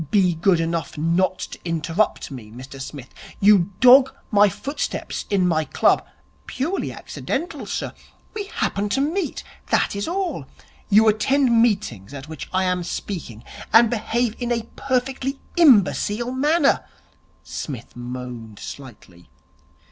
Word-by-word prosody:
'Be 185 -2 +3
good 170 +2 +2
enough 165 -1 -2
not 175 +4 +1
to - - -7
interrupt 165 +2 -1
me, 120 -6 -9
Mr 130 +4 -10
Smith. 135 -1 -8 0.3
You 200 -3 +5
dog 260 +1 +8 0.2
my 205 -1 +6
footsteps 280 - -4
in 190 -3 +2
my 160 -2 +2
club 150 - +2 0.2
' 70 +1 -36
'Purely 335 +9 -2
accidental, 330 +6 -5
sir. - - -3 0.4
We 420 -2 -4
happen 205 - -2
to - - +2
meet 315 +4 -1 0.2
that - - +1
is 200 - -3
all.' 370 +1 -2 0.4
'You 215 +2 +6
attend 235 +2 +3
meetings 145 - 0
at 135 +1 -8
which 160 -3 -8
I 185 0 +1
am 180 -1 0
speaking, 165 - -6 0.3
and 225 +2 +6
behave 235 0 -1
in 245 -1 -2
a 230 -1 0
perfectly 270 +1 -2 0.2
imbecile 240 - +4
manner.' 290 +3 +2 0.6
Psmith 125 -6 -7
moaned 120 -3 -7
slightly. 105 - -11
200 Hz, 135 wpm, -22 LUFS, -, 0.6 s, dog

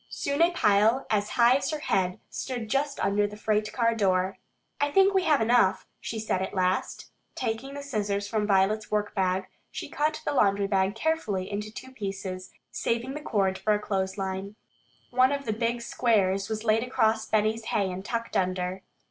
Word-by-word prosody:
Soon 280 +2 -2
a 340 - +6
pile 220 - +3
as 210 -1 +1
high 240 +2 +6
as 280 - -2
her 310 - -2
head 185 -10 0
stood 245 -4 -4
just 275 +1 0
under 205 +1 +2
the 210 0 -10
freight 215 0 0
car 230 -2 +2
door. 190 -3 +1 0.4
"I 290 - +2
think 390 +5 +4
we 380 -2 +2
have 300 -6 +3
enough," 225 -4 +3
she 225 - -5
said 215 -4 -1
at 190 - -4
last. 185 0 -1 0.2
Taking 260 +5 -3
the 285 - -6
scissors 205 -6 -2
from 210 -1 -1
Violet's 200 +2 +2
workbag, 190 -3 0 0.2
she - - -6
cut 305 +1 0
the - - 0
laundry 200 -5 +3
bag 195 0 +1
carefully 225 -10 -1
into 210 +1 -4
two 260 +4 -9
pieces, 195 -5 -5 0.2
saving 235 +3 -2
the 300 - -6
cord 195 -8 0
for 210 +2 +2
a - - -1
clothesline. 195 0 -3 0.6
One 255 +2 +4
of 280 -1 -2
the 220 - 0
big 235 +2 -1
squares 195 -5 +1
was 215 0 -3
laid 220 0 +3
across 220 -3 +1
Benny's 220 +1 +1
hay 200 -5 0
and 185 +1 -6
tucked 230 +2 -4
under. 185 0 -1
215 Hz, 180 wpm, -27 LUFS, 195-245 Hz, 0.6 s, a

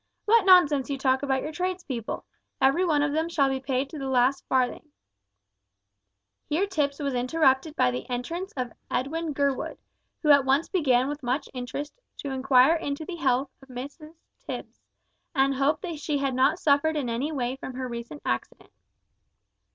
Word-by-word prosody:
What 435 -2 +4
nonsense 300 -8 +6
you 280 - -1
talk 265 -1 +2
about 265 -2 0
your 305 - -4
trades 365 +3 -3
people! 235 -5 -5 0.3
Every 275 +7 +3
one 300 -5 +2
of 290 0 0
them 320 +2 0
shall 280 -5 +2
be 265 0 -1
paid 265 0 -1
to 310 - -7
the 270 -1 -3
last 255 +1 +2
farthing 260 +3 0 0.8
" 100 0 -55
Here 330 +7 +2
Tipps 295 -8 -1
was 280 -3 -2
interrupted 265 +3 +2
by 125 - +3
the 125 +1 -6
entrance 330 +10 -4
of 250 -2 -2 0.2
Edwin 320 +5 -2
Gurwood, 280 -2 -1 0.5
who 300 - +5
at 280 -1 +7
once 270 +5 +2
began 265 -9 +2
with 295 +1 -4
much 260 +3 -1
interest 280 - -6 0.2
to 280 - -5
inquire 265 +2 +5
into 290 0 -4
the 350 0 -6
health 265 -2 +1
of 270 - -17
Mrs 285 +6 -8 0.2
Tipps, - - -7 0.6
and 275 0 +3
hoped 275 +6 +1
that 335 -5 -4
she 295 0 -1
had 275 -1 -1
not 265 +6 +3
suffered 310 -1 +2
in 275 -4 -1
any 240 +6 -2
way 255 -3 -2
from 265 -1 -7
her 255 0 -3
recent 235 +4 -7
accident. - - -3
275 Hz, 180 wpm, -26 LUFS, 255-310 Hz, 0.8 s, at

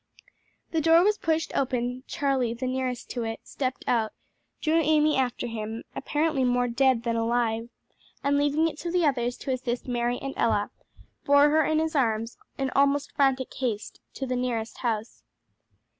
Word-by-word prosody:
The 325 - +1
door 330 +2 +6
was 420 +1 +2
pushed 320 0 -1
open, 250 -1 -1
Charlie, 265 -5 0
the 250 +2 -4
nearest 255 -1 -3
to 240 - -3
it, 225 0 -4
stepped 260 -1 -3
out, 225 -3 +1 0.5
drew 320 +1 +2
Amy 305 0 +3
after 255 -2 0
him, 225 -1 -5
apparently 300 -1 0
more 245 0 +2
dead 250 0 +2
than 230 -1 0
alive, 230 0 0 0.5
and 280 +1 +2
leaving 290 +3 +2
it 305 - -6
to 350 0 0
others 245 -5 +1
to 270 - -4
assist 250 -1 -3
Mary 240 0 0
and 275 0 -5
Ella, 205 -3 +1 0.5
bore 285 +1 +6
her 315 +1 +4
in 310 +2 +1
his 320 0 0
arms, 230 -3 0 0.2
in 270 -1 -1
almost 280 +1 +2
frantic 270 -2 +1
haste, 230 -5 -3 0.2
to 270 - -3
the 255 -1 -2
nearest 235 -3 -2
house. 225 -2 -3
255 Hz, 165 wpm, -27 LUFS, 235-290 Hz, 0.5 s, door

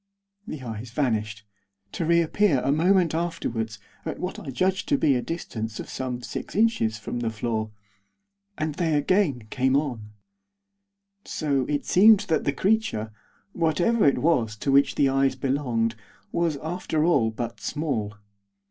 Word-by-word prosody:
The 145 -4 -6
eyes 115 0 -6
vanished, 110 -5 -1 0.5
to 165 - -3
reappear, 170 -1 +3
a - - +2
moment 175 +2 +3
afterwards, 120 -10 -2 0.3
at - - -4
what 180 +1 -4
I 145 - -8
judged 190 - 0
to 285 - +4
be 150 - +3
a 125 - 0
distance 115 -9 -5
of - - -7
some 125 -2 -4
six - - -6
inches 200 - +2
from 110 +3 -5
the 115 -1 -1
floor. 110 -1 -2 0.9
And 155 0 -2
they 160 -1 0
again 145 - +1
came 130 0 +2
on. 125 -8 -3 1.1
So 140 -5 -1
it 145 -1 -1
seemed 210 +2 +6
that 160 - +1
the - - +2
creature, 165 - 0 0.4
whatever 175 +8 +2
it 140 - +3
was 125 -10 +1
to 135 +6 -1
which 140 +1 +4
the 140 - +3
eyes 135 0 +2
belonged, 130 -4 0 0.4
was, 170 -3 0
after 160 -2 -1
all, 140 -10 +3
but 115 +1 -5
small. 125 -10 -2
140 Hz, 150 wpm, -25 LUFS, 115-170 Hz, 1.1 s, seemed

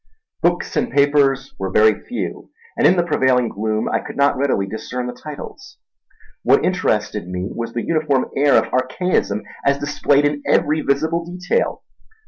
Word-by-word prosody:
Books - - 0
and 245 - 0
papers 140 - +2
were 95 0 -2
very 110 +3 +5
few, 245 - -5 0.3
and - - +4
in 185 - +4
the 175 - +3
prevailing 130 -6 +2
gloom 110 +1 -2
I - - 0
could - - -9
not 140 0 +3
readily 130 -7 0
discern 115 +5 -5
the 125 - -4
titles. 155 - -10 0.6
What - - +3
interested 110 - -1
me 90 +3 -4
was 115 0 -5
the 120 - -3
uniform 155 -5 +1
air 140 +1 +4
of - - +2
archaism 130 - 0 0.2
as 140 0 +2
displayed 145 0 +1
in 145 0 0
every 155 +1 +2
visible 160 +5 0
detail. 180 - -2
140 Hz, 160 wpm, -20 LUFS, 115-155 Hz, 0.6 s, very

